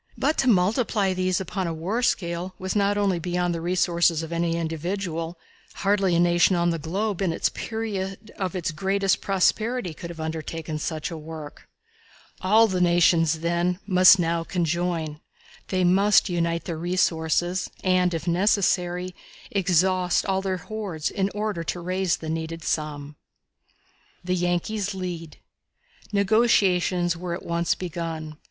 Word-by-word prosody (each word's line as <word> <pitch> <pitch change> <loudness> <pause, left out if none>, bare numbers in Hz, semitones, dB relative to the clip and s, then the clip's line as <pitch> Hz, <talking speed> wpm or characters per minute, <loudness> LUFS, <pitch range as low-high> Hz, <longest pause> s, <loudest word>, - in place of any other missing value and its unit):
But 310 - +1
to 265 - +2
multiply 205 0 +2
these 185 0 0
upon 190 0 -3
a 165 - -2
war 190 +9 -2
scale 180 -5 -1
was 185 +1 -4
not 205 0 +2
only 195 -4 +1
beyond 175 +1 -1
the 165 - -4
resources 170 -2 +2
of 160 - -7
any 170 0 0
individual 165 +1 -3 0.4
hardly 195 -3 +2
a - - +3
nation 175 +1 +4
on 170 0 +2
the 165 - -2
globe 195 +5 -2
in 190 - +1
the 165 - 0
period 215 -2 -4
of 190 -1 -3
its 170 -2 -2
greatest 195 +4 0
prosperity 205 +1 +1
could 170 +2 -8
have 170 -1 -9
undertaken 160 0 -4
such 155 +1 -3
a 165 - -5
work. 155 -1 -9 0.7
All 215 +4 +5
the 185 -4 -1
nations, 170 -2 +3
then, 170 +1 0
must 185 0 +7
now 170 -1 0
conjoin. 170 -3 -2 0.5
They 185 -1 0
must 195 +4 +4
unite 170 -1 0
their 165 -3 -4
resources, 175 0 0
and, 185 -1 +3
if 165 0 -4
necessary, 180 -1 +1 0.4
exhaust 185 -1 +2
all 190 -1 0
their 190 -1 -1
hoards, 185 -4 -4
in 195 -1 0
order 210 -5 -2
to 175 - -3
raise 185 0 0
the 160 - -7
needed 165 0 -4
sum. 150 -2 -3 1.1
The 180 +1 -1
Yankees 185 +3 -1
Lead. 175 -4 -6 0.7
Negotiations 195 -4 +2
were 170 0 -4
at - - -9
once 170 0 0
begun. 165 -3 -5
180 Hz, 145 wpm, -25 LUFS, 165-190 Hz, 1.1 s, must